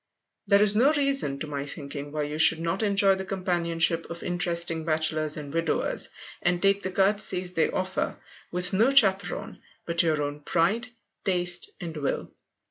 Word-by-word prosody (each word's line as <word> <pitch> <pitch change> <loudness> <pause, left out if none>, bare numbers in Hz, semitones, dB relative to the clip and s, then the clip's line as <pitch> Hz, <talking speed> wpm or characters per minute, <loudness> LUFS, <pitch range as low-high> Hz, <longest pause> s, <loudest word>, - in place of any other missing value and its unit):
There 200 +1 +5
is 210 0 +3
no 260 +7 +4
reason, 275 - +2
to - - -2
my 145 -2 -4
thinking, 145 0 -6
why 150 0 -2
you 150 +1 -5
should 160 0 +6
not 165 +4 -2
enjoy 200 -2 +3
the 190 0 -4
companionship 170 -3 -1
of 170 0 -7
interesting 170 -2 -1
bachelors 155 -1 +1
and 145 -1 -8
widowers, 165 -1 +1 0.3
and 175 0 +1
take 195 +1 +2
the 190 - -4
courtesies 190 -2 +1
they 165 - +1
offer, 185 0 -3 0.3
with 180 +1 +1
no 220 +7 +3
chaperon 200 -8 +1 0.2
but 170 0 +2
your 155 -3 +1
own 145 0 -5
pride, 190 +11 0 0.4
taste, 175 -2 -1
and 165 -2 -7
will. 140 -2 -3
175 Hz, 165 wpm, -26 LUFS, 160-195 Hz, 0.4 s, should